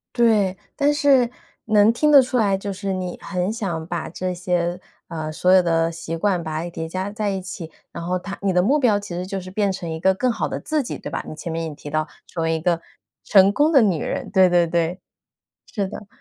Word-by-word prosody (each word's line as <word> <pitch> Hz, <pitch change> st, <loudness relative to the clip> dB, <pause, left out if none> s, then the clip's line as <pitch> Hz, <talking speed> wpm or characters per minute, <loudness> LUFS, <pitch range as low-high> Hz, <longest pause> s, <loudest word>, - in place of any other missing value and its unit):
对， 210 Hz, -6 st, +3 dB, 0.2 s
但 290 Hz, 0 st, +2 dB
是， 270 Hz, -5 st, +4 dB, 0.4 s
能 215 Hz, 0 st, +5 dB
听 300 Hz, +5 st, +2 dB
得 280 Hz, -2 st, +9 dB
出 255 Hz, 0 st, -1 dB
来， 200 Hz, -4 st, +2 dB
就 200 Hz, 0 st, -4 dB
是 195 Hz, 0 st, -3 dB
你 185 Hz, -1 st, -4 dB
很 180 Hz, +1 st, -2 dB
想 175 Hz, -8 st, -3 dB
把 175 Hz, -2 st, -4 dB
这 185 Hz, +2 st, -3 dB
些， 175 Hz, 0 st, -1 dB, 0.3 s
呃， 155 Hz, -2 st, -4 dB
所 180 Hz, +4 st, +2 dB
有 185 Hz, -, +7 dB
的 165 Hz, -1 st, +1 dB
习 165 Hz, 0 st, -5 dB
惯 180 Hz, -2 st, 0 dB
把 155 Hz, 0 st, -3 dB
它 175 Hz, -, -5 dB
叠 160 Hz, -1 st, -5 dB
加 185 Hz, +4 st, -4 dB
在 210 Hz, 0 st, -2 dB
一 195 Hz, -1 st, -2 dB
起。 175 Hz, -3 st, -7 dB, 0.2 s
然 170 Hz, -, -7 dB
后 180 Hz, +1 st, 0 dB
它 195 Hz, +2 st, -7 dB
你 200 Hz, -1 st, +1 dB
的 180 Hz, -, +3 dB
目 275 Hz, +11 st, +3 dB
标 215 Hz, -6 st, +3 dB
其 205 Hz, -, -10 dB
实 180 Hz, +1 st, -4 dB
就 195 Hz, 0 st, -3 dB
是 185 Hz, 0 st, -9 dB
变 200 Hz, -1 st, +1 dB
成 180 Hz, -3 st, -5 dB
一 160 Hz, 0 st, -4 dB
个 190 Hz, +2 st, +3 dB
更 250 Hz, +4 st, +1 dB
好 -, -, -2 dB
的 -, -, -4 dB
自 310 Hz, -1 st, -1 dB
己， 240 Hz, -, -5 dB
对 -, -, -8 dB
吧？ -, -, -3 dB
你 155 Hz, -, -7 dB
前 165 Hz, +2 st, -6 dB
面 165 Hz, 0 st, -2 dB
也 155 Hz, -, -6 dB
提 145 Hz, 0 st, -9 dB
到， 155 Hz, +1 st, -1 dB, 0.2 s
成 170 Hz, -, -5 dB
为 165 Hz, 0 st, +1 dB
一 160 Hz, -, -2 dB
个 170 Hz, 0 st, +1 dB, 0.4 s
成 195 Hz, -1 st, +6 dB
功 300 Hz, +6 st, +3 dB
的 275 Hz, -5 st, +6 dB
女 185 Hz, -8 st, +2 dB
人， -, -, -3 dB
对 190 Hz, -2 st, +5 dB
对 175 Hz, -1 st, +4 dB
对， 170 Hz, +2 st, -1 dB, 0.7 s
是 200 Hz, -3 st, -1 dB
的， 210 Hz, 0 st, -9 dB
185 Hz, 265 characters per minute, -22 LUFS, 170-205 Hz, 0.7 s, 得